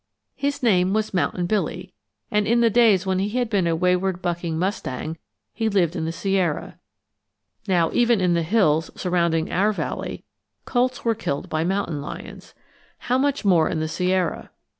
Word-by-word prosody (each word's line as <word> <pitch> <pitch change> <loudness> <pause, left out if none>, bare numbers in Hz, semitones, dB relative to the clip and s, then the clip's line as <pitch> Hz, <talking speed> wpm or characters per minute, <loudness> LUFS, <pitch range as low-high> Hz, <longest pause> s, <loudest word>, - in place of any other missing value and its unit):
His 285 -1 -2
name 190 -4 +3
was 215 -1 -1
Mountain 180 -1 0
Billy, 185 -1 -2 0.4
and 210 0 +1
in 235 +2 +3
the 230 -1 +4
days 215 -4 +4
when 190 -1 0
he 200 +2 0
had 245 -3 -1
been 190 -5 +2
a 165 - +1
wayward 180 +1 +1
bucking 170 -2 -2
mustang 160 -4 -3 0.3
he 225 -1 -1
lived 180 -5 +1
in 160 - -2
the 165 - -2
Sierra. 185 -3 -1 0.9
Now, 175 -4 +2
even 240 -2 +3
in 180 -2 +2
the 170 - +2
hills 165 -4 +2
surrounding 170 -3 0
our 200 +4 +2
valley, 210 - -4 0.4
colts 250 0 0
were 230 - +3
killed 145 -10 -4
by 155 0 0
mountain 180 -5 -1
lions. 145 - -9 0.4
How 250 +1 0
much 280 -4 0
more 170 -5 +4
in 160 - -2
the 155 - -1
Sierra. 180 +2 -1
185 Hz, 170 wpm, -23 LUFS, 170-215 Hz, 0.9 s, the